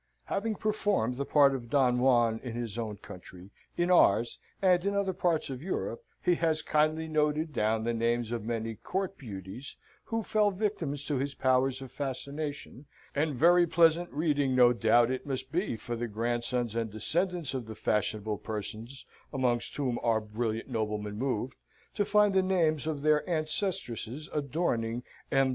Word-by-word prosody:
Having 215 +2 -1
performed 205 - 0
the 140 - -2
part 140 -2 +5
of 120 -3 -5
Don 125 -3 +3
Juan 120 -3 +3
in 120 -3 -5
his 115 -3 -4
own 110 -3 -4
country, 90 -1 -12 0.3
in 175 +1 +2
ours, 115 - +4 0.2
and 180 -3 +4
in 200 +1 0
other 200 -2 +1
parts 170 -5 0
of 130 -1 -6
Europe, 190 - -3 0.2
he 180 - +4
has 160 -2 +1
kindly 155 +1 +1
noted 155 0 0
down 110 -2 +1
the 120 +1 0
names 115 0 0
of 115 -3 -3
many 115 0 -2
court 190 - -3
beauties 105 - -8 0.3
who 225 -1 -2
fell 210 0 +2
victims 190 -8 -2
to 145 - -1
his 140 +2 -2
powers 130 0 +2
of 130 - -10
fascination; 140 0 -5 0.3
and 150 0 0
very 175 +5 +5
pleasant 170 +1 +3
reading 145 -4 +1
no 125 -1 +6
doubt 120 +1 +4
it 130 +2 -4
must 130 -1 -3
be 175 - -1
for 120 +2 -5
the 120 +1 -3
grandsons 120 +1 -1
and 115 -1 -1
descendants 170 - -1
of 125 -4 -4
the 110 - -7
fashionable 105 0 -1
persons 110 +4 -5 0.3
amongst 125 -4 0
whom 130 -5 -1
our 115 -2 +2
brilliant 110 +1 -3
nobleman 105 -4 -2
moved, 125 +1 -2 0.4
to 205 - +1
find 210 0 +3
the 190 - +4
names 165 -5 +1
of 150 -3 -3
their 150 -1 +4
ancestresses 155 - -1
adorning 125 -6 -1 0.3
M. 135 -1 +3
135 Hz, 165 wpm, -30 LUFS, 115-160 Hz, 0.4 s, no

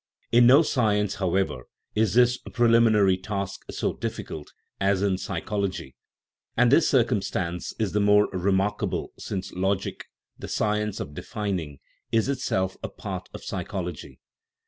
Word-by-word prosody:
In 120 0 +6
no 140 +6 +8
science, 105 - +1
how 95 -1 +1
ever, 95 -10 -1 0.3
is 110 -1 +1
this 125 0 +4
preliminary 115 -5 +4
task 100 0 -4
so - - -1
difficult 75 -2 -6 0.3
as 100 0 +2
in 95 -2 +2
psychol 95 +3 -3
ogy; 65 -8 -8 0.6
and 120 +1 +5
this 155 +4 +5
circumstance 95 -8 0
is 110 -4 -1
the 105 - +1
more 105 0 +5
remarkable 95 +2 0
since 95 -2 -4
logic, 95 +1 -1 0.3
the - - -6
science 105 -1 -1
of 75 - -6
defining, 90 -7 -4 0.3
is 115 +3 +2
itself 95 -8 -1
a - - -4
part - - -6
of - - -9
psychology. 90 -5 -5
100 Hz, 140 wpm, -26 LUFS, 95-110 Hz, 0.6 s, no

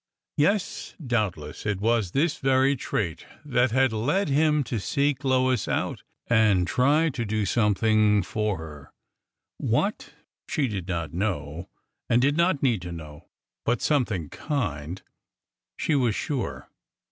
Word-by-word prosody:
Yes, 190 +6 0
doubtless 100 - -2
it 105 -2 -1
was 110 -2 +1
this 145 - +1
very 135 +1 +3
trait 95 - -3 0.2
that 125 -3 +2
had 130 0 +2
led 145 - 0
him 150 +1 +3
to 115 -2 -3
seek 140 +8 0
Lois 130 -1 +2
out - - -1 0.2
and 110 -6 +3
try 145 - +3
to 125 -4 -3
do 110 -1 -1
something 105 -1 +3
for 105 +1 -1
her 75 -3 -10 0.4
— - - -62
what, - - -1 0.3
she 145 -3 +1
did 95 -6 -4
not 85 -4 -3
know 85 -4 -3 0.4
and 120 - +4
did 140 +3 +3
not 170 -3 +2
need 120 -8 +2
to 90 0 -6
know, 75 -3 -10 0.4
but 120 - +1
something 110 - 0
kind, 90 - -3 0.7
she 160 - 0
was 125 -7 +2
sure. 140 -5 -3
115 Hz, 140 wpm, -26 LUFS, 95-135 Hz, 0.7 s, and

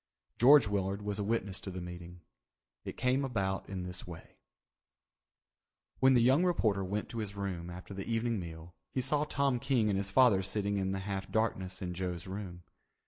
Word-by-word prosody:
George 135 0 +8
Willard 100 0 -1
was 105 0 -3
a - - 0
witness 100 -2 -1
to - - -6
the 95 -1 -5
meeting. 90 0 -9 0.6
It - - -6
came 130 +2 +1
about 100 -7 -2
in 95 -2 -4
this 90 -1 -5
way: 85 -2 -11 1.6
When 130 0 +6
the 120 - +5
young 135 +8 +5
reporter 110 - +2
went 100 +3 -2
to 115 - -5
his 105 -2 -4
room 95 -4 -4
after 90 +3 -9
the 95 0 -6
evening 115 -1 0
meal 85 0 -8 0.2
he - - -3
saw 145 +3 +1
Tom 140 -3 +1
King 120 -4 +1
and 95 - +1
his 100 0 0
father 105 -2 +5
sitting 100 +1 -1
in 95 -1 0
the 95 0 -2
half 95 -1 -4
darkness 95 -5 -1
in 90 -1 -3
Joe's 90 -1 -4
room. 95 -2 -7
100 Hz, 190 wpm, -32 LUFS, 95-115 Hz, 1.6 s, George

